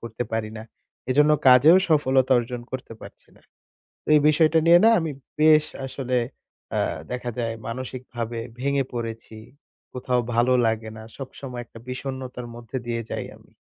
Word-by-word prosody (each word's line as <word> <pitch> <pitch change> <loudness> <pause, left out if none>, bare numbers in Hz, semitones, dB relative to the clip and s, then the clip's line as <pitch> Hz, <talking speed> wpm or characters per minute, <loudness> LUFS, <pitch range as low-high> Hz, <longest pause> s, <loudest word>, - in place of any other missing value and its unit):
করতে 115 0 -5
পারি 110 -1 -2
না। 110 - -7 0.5
এজন্য 150 +3 +4 0.2
কাজেও 140 +7 +8
সফলতা 135 -4 +3
অর্জন 120 0 -4
করতে 130 -3 -6
পারছি - - -14
না। - - -23 0.6
তো - - -34
এই 150 - +5
বিষয়টা 155 +1 +4
নিয়ে 170 +1 +7
না 225 - +8
আমি 160 -2 -3 0.3
বেশ 155 0 +6 0.2
আসলে 130 -1 -2 0.5
অ্যা - - 0 0.3
দেখা 125 0 -3
যায় 115 -1 -1
মানসিক 130 +2 -5
ভাবে 115 0 -3 0.2
ভেঙে 140 +1 +1
পড়েছি। 115 -2 -6 0.6
কোথাও 125 -1 0
ভালো 120 +2 +3
লাগে 110 0 -2
না, 110 - -9
সবসময় 130 -2 -7
একটা 115 - -14
বিষন্নতার 125 -1 -6
মধ্যে 120 +2 -6
দিয়ে 115 -1 -2
যাই - - -3
আমি। - - -24
125 Hz, 160 wpm, -24 LUFS, 120-140 Hz, 0.6 s, কাজেও